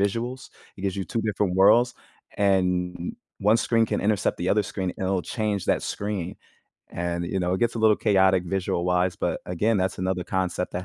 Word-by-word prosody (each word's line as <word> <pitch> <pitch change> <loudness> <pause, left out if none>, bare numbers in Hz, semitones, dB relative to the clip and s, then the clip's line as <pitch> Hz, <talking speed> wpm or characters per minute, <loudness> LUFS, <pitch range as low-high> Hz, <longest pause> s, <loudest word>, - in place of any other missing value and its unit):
visuals? 115 +6 -2 0.3
It 95 - -10
gives 95 -1 -1
you 95 - -2
2 115 - -2
different 100 -4 0
worlds, 115 +5 +5 0.4
and 90 -3 +1
n 85 - -5
n - - -18 0.2
1 105 +3 +4
screen 115 -1 +2
can - - -1
intercept 105 -2 +1
the 90 +1 -2
other 105 0 +3
screen, 95 -2 -3
and 95 - -3
it'll 95 -1 0
change 105 -2 -2
that - - +1
screen. 100 -4 -4 0.5
And, 85 0 -2
you 95 +1 -2
know, 90 +1 0
it - - -2
gets 120 0 +1
a - - -3
little 110 -1 +5
chaotic 95 -3 +3
visual-wise, 90 0 0
but - - -2
again, 105 +4 +1
that's 95 0 -1
another 95 -1 -1
concept 90 -1 -2
that 90 +1 -4
95 Hz, 205 wpm, -25 LUFS, 90-105 Hz, 0.5 s, worlds